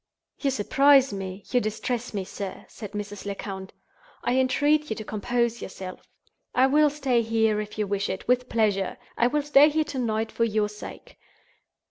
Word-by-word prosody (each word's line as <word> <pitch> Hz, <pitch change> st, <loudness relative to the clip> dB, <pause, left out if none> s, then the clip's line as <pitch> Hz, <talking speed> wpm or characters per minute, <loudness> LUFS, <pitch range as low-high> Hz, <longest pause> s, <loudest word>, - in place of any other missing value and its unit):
"You 280 Hz, -, +1 dB
surprise 270 Hz, +2 st, +4 dB
me—you 195 Hz, +5 st, -2 dB
distress 230 Hz, +3 st, -3 dB
me, 200 Hz, -3 st, -2 dB
sir," 195 Hz, 0 st, -7 dB
said 210 Hz, -2 st, -9 dB
Mrs. 205 Hz, -1 st, -5 dB
Lecount. 195 Hz, -1 st, -6 dB, 0.5 s
"I 245 Hz, -, +1 dB
entreat 290 Hz, +4 st, +2 dB
you 220 Hz, -, -1 dB
to 215 Hz, -, -6 dB
compose 235 Hz, +3 st, -1 dB
yourself. 185 Hz, -1 st, -7 dB, 0.5 s
I 255 Hz, -, +5 dB
will 300 Hz, +3 st, +4 dB
stay 270 Hz, -5 st, +1 dB
here, 220 Hz, -1 st, +1 dB
if 210 Hz, 0 st, -8 dB
you 210 Hz, -, 0 dB
wish 200 Hz, 0 st, -1 dB
it, 190 Hz, -, -5 dB
with 250 Hz, +1 st, +2 dB
pleasure—I 215 Hz, +1 st, 0 dB
will 295 Hz, +3 st, 0 dB
stay 295 Hz, 0 st, +6 dB
here 310 Hz, +1 st, +1 dB
to 295 Hz, -3 st, -5 dB
night, 220 Hz, -2 st, -1 dB
for 230 Hz, -, 0 dB
your 215 Hz, -2 st, +1 dB
sake. 210 Hz, 0 st, -11 dB
225 Hz, 165 wpm, -26 LUFS, 205-260 Hz, 0.5 s, stay